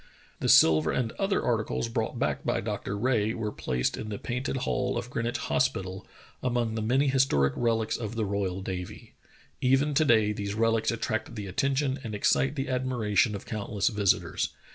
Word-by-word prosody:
The - - -1
silver 80 -1 +6
and 115 -3 -1
other 195 0 +1
articles 115 0 0
brought 115 -1 -2
back - - -1
by - - 0
Dr. 100 - -3
Rae 110 -1 +1
were 110 -2 -3
placed 60 -9 -1
in 110 - -5
the 105 - -4
Painted 125 +5 -3
Hall 125 -1 0
of 120 +1 -5
Greenwich 120 0 -1
Hos 130 +3 +2
pital, 95 -5 -7 0.3
among 120 -3 0
the 110 - -2
many 130 +6 +2
historic 100 - +3
relics 115 -2 0
of 115 -1 -5
the 110 -2 0
royal 95 -2 -2
navy. 90 -1 -6 0.5
Even 135 +3 +3
to 155 - +4
day 110 -6 +4
these 100 0 -4
relics 115 0 +2
attract 115 0 -2
the 105 -2 -5
attention 135 +7 0
and 110 -3 -5
excite 135 +6 +2
the 135 -1 -2
admiration 120 -5 +1
of 100 - -7
countless 105 -2 -1
visitors. 105 -4 +1
115 Hz, 180 wpm, -28 LUFS, 105-125 Hz, 0.5 s, silver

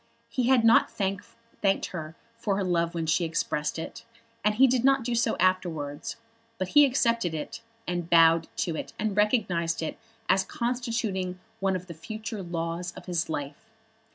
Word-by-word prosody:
He 250 -2 0
had 255 -3 +5
not 225 - +6
thanked 195 -1 -2 0.6
her 160 -3 -6 0.2
for 205 -4 0
her 200 - 0
love 170 -2 0
when 165 -1 -1
she 160 +2 +2
expressed 160 -2 -1
it, 165 +7 -6 0.4
and 210 0 +2
he 260 +4 +7
did 250 -2 +2
not 270 -1 +4
do 240 +1 -1
so 230 -1 +1
afterwards. 170 -6 0 0.4
But 185 -2 -2
he 295 +5 +7
accepted 230 -9 +1
it, 225 +9 -5 0.2
and 175 -1 -3
bowed 165 -1 +6 0.2
to 165 - -2
it, - - -6
and 215 -2 -1
recognised 190 -7 +1
it 160 - -4 0.3
as 190 - +4
constituting 230 -6 -2 0.2
one 195 -1 +1
of 185 0 -4
the 170 - -8
future 215 +5 -6
laws 170 0 -3
of - - -11
his 175 -3 -1
life. 150 +9 -5
185 Hz, 170 wpm, -27 LUFS, 165-225 Hz, 0.6 s, he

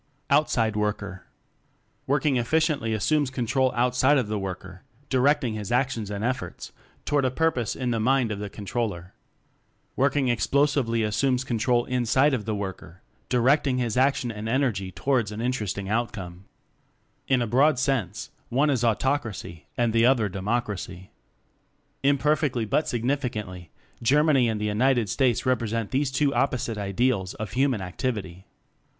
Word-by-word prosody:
Outside 120 -7 +2
Worker 100 -3 -3 0.8
"Working 140 0 +2
Efficiently" 145 -1 +1
assumes 130 +7 +1
control 130 0 0
outside 125 +4 +3
of 120 -6 -1
the 105 -1 -1
worker, 95 -1 -7 0.3
direct 140 +3 +3
ing 120 -3 -1
his 105 -1 -5
actions 120 -4 0
and 100 0 -4
efforts 130 +1 -3 0.3
toward 145 -1 +1
a 130 - +2
purpose 130 -4 0
in 125 -2 -2
the 115 - 0
mind 125 0 +2
of 100 - -4
the 105 0 -5
con 100 +1 -9
troller. 95 -6 -3 0.8
"Working 135 0 +2
Explosively" 120 0 +1
assumes 125 +5 +1
control 120 -1 +1
inside 125 +3 +2
of 110 -6 -2
the 110 -1 -1
worker, 95 -3 -7 0.3
di 125 - +2
recting 130 +1 +3
his 120 -4 -1
action 130 -2 +2
and 110 0 -5
energy 115 -7 0
towards 120 0 0
an 105 - -6
interesting 110 -5 -2
outcome. 100 -5 -3 0.8
In 130 -2 +3
a 120 - 0
broad 135 +6 +3
sense, 125 -7 -1 0.2
one 145 +4 +2
is 125 -4 0
Autocracy 115 - -1
and 120 -2 +1
the 115 +1 +4
other 125 -5 +3
Democracy. 95 -2 -4 0.9
Imper 145 +2 +3
fectly 125 -7 -1
but 150 - +1
significantly, 115 -8 -3 0.3
Germany 135 0 +3
and 110 -1 -2
the 105 - -2
United 115 +1 +2
States 125 0 +1
repre 125 -3 0
sent 115 -1 -3
these 135 +1 +1
two 140 +1 +1
opposite 120 -4 -1
ideals 100 -1 0
of 110 - -6
human 130 -3 +1
activity. 95 -2 -4
120 Hz, 150 wpm, -25 LUFS, 105-135 Hz, 0.9 s, the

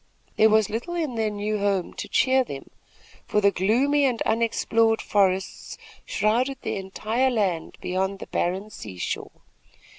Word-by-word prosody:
There 220 - +5
was 215 -1 +4
little 240 +11 -3
in 315 -7 -1
their 220 -2 0
new 210 +1 -2
home 200 -3 0
to - - -6
cheer 260 0 +3
them; 140 - -9 0.6
for 210 - +2
the 200 -1 +4
gloomy 260 +10 +2
and 245 -4 +1
unexplored 225 0 +2
forests 190 -2 0 0.3
shrouded 245 +6 +1
the - - -2
entire 215 +6 -1
land 195 -9 -1
beyond 190 +2 -1
the - - -8
barren 190 +5 -2
seashore. 95 - -6
215 Hz, 145 wpm, -25 LUFS, 195-235 Hz, 0.6 s, There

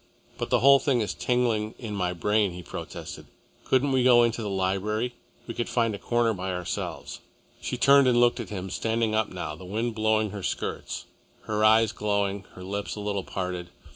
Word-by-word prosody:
"But - - -3
the - - +3
whole 140 +1 +7
thing 135 -2 +1
is 105 - -2
tingling 115 -4 0
in 110 -4 -6
my 90 -2 0
brain," 105 +2 +1
he 90 0 -8
protested. - - -8 0.4
"Couldn't 135 +2 +2
we 130 -1 +3
go 120 -1 +7
into 115 0 0
the 105 - -3
library? 100 +5 -1 0.3
We 115 - -5
could 120 - -3
find 115 -3 +1
a 100 - -6
corner 120 -1 +1
by 95 -1 -4
ourselves." 90 -1 -4 0.4
She - - -3
turned 140 0 +6
and 120 -1 +4
looked 120 +1 +4
at 115 -6 -5
him, 95 -2 -5
standing 115 -1 0
up 110 -1 +1
now, 80 -4 -5
the 90 - -12
wind 110 +6 -2
blowing 110 -1 +1
her 100 -1 -6
skirts, - - -4 0.4
her 105 0 -1
eyes 110 0 +5
glowing, 100 -1 -1
her 90 - -10
lips 100 +2 -4
a - - -7
little 100 -2 -2
parted. 90 -2 -4
105 Hz, 200 wpm, -27 LUFS, 95-120 Hz, 0.4 s, whole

